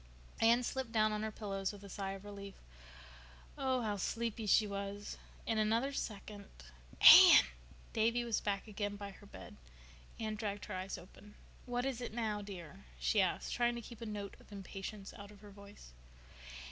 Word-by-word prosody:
Anne 235 +2 +5
slipped 260 -1 -3
down 215 -1 +3
on 210 0 -2
her 220 - -2
pillows 195 -3 -3
with 205 -1 -12
a - - -9
sigh 195 0 -4
of 195 +1 -10
relief. 200 -1 -8 1.0
Oh—how 250 -6 0
sleepy—she 225 0 +1
was! 200 0 -5 0.3
In 225 -1 0
another 230 +6 +1
second— 205 -4 -6 0.5
"Anne!" - - +11 0.5
Davy 230 +2 +2
was 235 -3 -1
back 200 +1 -2
again 205 -1 -3
by 200 0 -7
her 200 +1 -15
bed. - - -11 0.6
Anne 220 -1 -2
dragged 205 -1 -4
her 210 - -7
eyes 185 +1 -4
open. 205 +3 -15 0.3
"What 245 +1 -1
is 260 -3 -2
it 240 - -5
now, 215 -3 -1
dear?" 175 - -9 0.2
she - - +3
asked, - - -1
trying 240 0 +1
to - - -4
keep 235 0 -11
a 230 - -5
note 205 -2 -5
of - - -19
impatience 195 +1 -7
out 200 0 -10
of 205 -1 -15
her 205 -1 -12
voice. 200 - -14
210 Hz, 170 wpm, -35 LUFS, 200-225 Hz, 1.0 s, Anne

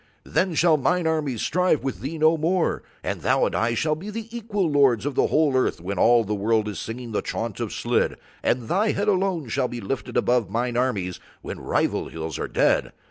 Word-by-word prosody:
Then 185 -3 0
shall 160 0 +4
mine 175 +5 +1
armies 150 -7 0
strive 180 -4 +1
with 135 - -3
thee 150 +5 -5
no 160 +1 +4
more, 165 +3 0 0.2
and - - -3
thou - - +3
and - - -2
I 115 +1 +1
shall 155 +5 +1
be 175 +7 -6
the 225 +2 -7
equal 210 -5 -1
lords 140 -6 +3
of 145 - -1
the - - +2
whole 150 -3 +2
earth 130 - +1
when 90 +2 -4
all 120 0 +5
the 105 0 -3
world 105 +1 +1
is 105 - -4
singing 120 +1 -6
the 105 - 0
chaunt - - -4
of - - -3
Slid, - - 0 0.2
and 125 - +1
thy 210 - +2
head 205 +1 -1
alone 185 -7 +1
shall 130 +3 0
be 120 - -6
lifted 120 +3 -4
above 120 -4 +2
mine 120 +3 -1
armies 105 -8 -1 0.2
when - - -6
rival - - 0
hills 80 -2 -5
are - - -2
dead. - - +1
135 Hz, 215 wpm, -24 LUFS, 115-170 Hz, 0.2 s, all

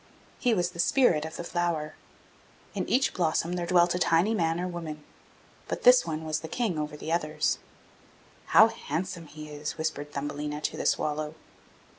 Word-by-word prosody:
He 245 -3 +2
was 175 -2 0
the 170 - -12
spirit 170 - +3
of 160 - -7
the - - -5
flower. 170 -3 -1 0.8
In - - -3
each 260 +2 +2
blossom 170 0 0
there 175 -1 -2
dwelt 175 -1 +4
a 180 - -1
tiny 175 +5 +3
man 165 -4 +1
or 180 - -1
woman; 160 -4 -6 0.6
but - - -4
this - - +7
one 155 +1 -3
was 155 -1 -1
the 160 - -7
King 190 -3 -1
over 150 0 -4
the 160 - -5
others. 155 -2 0 0.9
'How - - +7
handsome 170 -1 -4
he 155 0 -10
is!' 150 0 -5
whispered 155 -2 -3
Thumbelina 145 +1 -4
to - - -2
the - - -1
swallow. 150 +1 0
165 Hz, 175 wpm, -28 LUFS, 150-175 Hz, 0.9 s, this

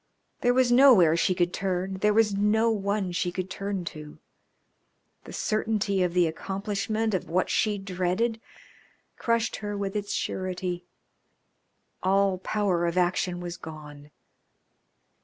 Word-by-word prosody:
There 245 0 +2
was 255 -1 +3
nowhere 240 - +7
she 180 +2 +1
could 175 -1 0
turn, 190 0 -2
there 210 +2 +3
was 215 -1 +3
no 215 +3 +2
one 200 -2 -1
she 175 0 -1
could 185 +1 -5
turn 195 -2 -3
to. 150 -1 -10 1.1
The - - -10
certainty 215 -3 0
of 180 -1 0
the 180 -1 +4
accomplishment 205 +6 -2
of 185 - -2
what 180 +3 0
she 210 -2 +1
dreaded 195 +4 -1 0.7
crushed 230 -1 0
her 205 -1 -4
with 200 0 -3
its 205 -1 -3
surety. 180 -2 -3 1.2
All 195 0 +2
power 185 -4 0
of 170 +1 -2
action 180 0 0
was 175 0 -6
gone. 150 -3 -10
195 Hz, 135 wpm, -27 LUFS, 180-210 Hz, 1.2 s, nowhere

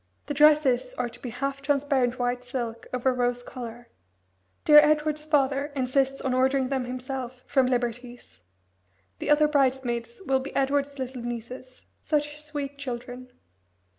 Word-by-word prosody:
The 290 - -3
dresses 300 - +4
are 240 - -2
to 235 +1 -11
be 250 - -5
half 275 +3 -3
transparent 275 -3 +1
white 245 0 -1
silk 240 -2 -5
over 255 +1 +1
rose 245 0 0
colour. 240 -1 -8 0.8
Dear 300 -1 +10
Edward's 300 0 +2
father 280 -2 +2
insists 270 +1 0
on 265 - -1
ordering 260 0 +2
them 265 -2 -1
himself 255 0 -6
from 265 -3 +2
Liberty's. 245 - -3 0.8
The - - -3
other 300 0 +5
bridesmaids 255 -5 0
will 265 -1 +2
be 265 - -8
Edward's 280 +1 0
little 260 -1 -5
nieces 240 +2 -7 0.2
such 295 0 -1
sweet 290 -2 -5
children. 250 -1 -6
260 Hz, 140 wpm, -26 LUFS, 245-285 Hz, 0.8 s, Dear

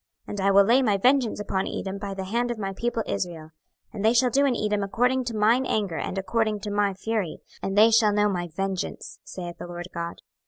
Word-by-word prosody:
26:025:014 - - -11
And 205 - -4
I 195 - +3
will 200 0 +7
lay 240 +6 +4
my 210 -6 +2
vengeance 250 +1 +2
upon 195 -2 -2
Edom 195 0 -4
by 200 -1 -5
the 190 - -4
hand 235 +6 -1
of 240 - -3
my 195 -2 -3
people 235 +2 -2
Israel: 160 -3 -4 0.4
and 205 -2 -5
they 220 +2 +4
shall 245 +1 +3
do 280 +2 +3
in 255 - +1
Edom 210 -2 0
according 245 +6 +1
to 235 -2 -3
mine 225 +5 +4
anger 200 -7 -1
and 195 - -4
according 215 +2 0
to 205 - -4
my 205 -1 +1
fury; 205 -3 -2 0.2
and 195 +1 -3
they 220 +2 +7
shall 220 -1 +5
know 210 0 +3
my 175 -3 -2
vengeance, 190 +3 -4
saith 175 -2 -8
the - - -6
Lord 175 0 -7
GOD. 170 0 -5
205 Hz, 235 wpm, -25 LUFS, 190-230 Hz, 0.4 s, will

